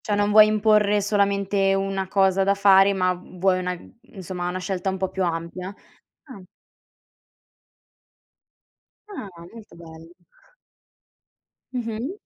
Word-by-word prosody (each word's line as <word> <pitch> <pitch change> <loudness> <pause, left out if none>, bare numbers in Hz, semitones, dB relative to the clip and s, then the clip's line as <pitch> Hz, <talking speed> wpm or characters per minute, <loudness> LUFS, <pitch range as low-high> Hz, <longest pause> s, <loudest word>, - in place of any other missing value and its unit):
Cioè 205 - 0
non 205 0 0
vuoi 215 0 +7
imporre 210 -1 +2
solamente 200 -1 +1
una 195 0 -2
cosa 195 0 +2
da 200 +1 +1
fare, 195 0 +5
ma 185 -1 0
vuoi 185 +1 -2
una 180 0 -3 0.4
insomma 180 -2 -5
una 180 - -4
scelta 185 0 -3
un 190 - -3
po' 190 0 -2
più 190 0 -3
ampia? 170 +2 -4 0.5
Ah. 255 -9 -12 2.7
Ah, 395 - -8 0.3
molto 225 -5 -14
bello. 165 0 -14 1.6
Mh-mh. 235 +3 -4
195 Hz, 115 wpm, -23 LUFS, 185-205 Hz, 2.7 s, vuoi